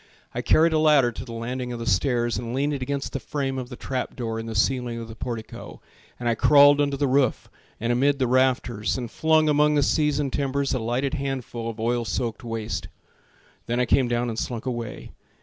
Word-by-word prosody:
I 120 - -2
carried 160 +7 +4
a 155 - +3
ladder 150 -6 +4
to 115 - -7
the 125 - -10
landing 125 +2 -4
of 120 - -4
the 115 - -5
stairs 120 +3 +1
And 120 +2 -4
leaned 145 +2 0
it 140 - -4
against 140 +1 -3
the 135 - -2
frame 135 -1 -3
of 125 -1 -6
the 125 - -7
trap 130 +1 -4
door 115 -2 -3
In 115 - -6
the 110 - -5
ceiling 120 +2 0
of 115 -1 -6
the 110 - -10
portico, 115 -1 -7 0.4
And 120 - -3
I 120 - +3
crawled 145 +4 +6
under 140 -1 0
the 145 - +1
roof 130 -2 +1 0.3
and 115 +2 0
amid 140 +3 +2
the 130 - +1
rafters 125 -4 +1
And 120 -3 -5
flung 160 -1 +3
among 150 0 +3
the 145 - +3
seasoned 150 -3 +1
timbers 140 0 0
A 130 - 0
lighted 120 +4 -1
handful 130 -5 -3
of 115 -1 -8
oil 120 +1 0
soaked 115 +3 -3
waste. 110 -7 -4 0.8
Then 120 +1 0
I 125 - +3
came 130 +1 +3
down 120 0 0
and 115 -1 -3
slunk 120 -1 -4
away. 120 -4 -5
125 Hz, 220 wpm, -24 LUFS, 115-140 Hz, 0.8 s, crawled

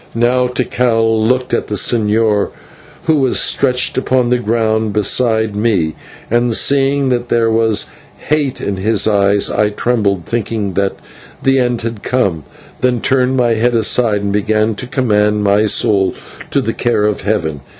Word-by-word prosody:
Now 125 +2 +2
Tikal 115 -3 0
looked 125 +2 0
at - - -1
the 105 - -3
señor, 105 +2 +1 0.5
who 160 - +2
was 130 -3 +1
stretched 125 -2 +1
upon 125 -2 0
the 125 0 +1
ground 110 -1 0
beside 110 0 +1
me, 100 -8 0 0.4
and 120 0 +1
seeing 140 +1 +1
that 120 -1 -2
there 115 -1 +1
was 110 -1 +1 0.4
hate 145 -3 0
in 100 -1 -3
his 105 +2 +1
eyes 100 -1 +2
I 105 0 +1
trembled, 105 -5 -1
thinking 110 -3 -3
that 100 +1 -1 0.5
the 135 0 +3
end 120 -2 -1
had 115 -3 -5
come, 95 - -1 0.3
then 125 -1 +1
turned 130 +1 +1
my 120 -2 +2
head 120 +2 0
aside, 110 -1 +1
and 100 0 -2
began 110 +2 0
to 120 - -7
commend 105 -5 +1
my 100 +1 +2
soul 100 -2 +1 0.3
to - - 0
the - - -2
care 120 -3 0
of 105 0 0
Heaven. 85 -8 -2
115 Hz, 160 wpm, -15 LUFS, 105-125 Hz, 0.5 s, the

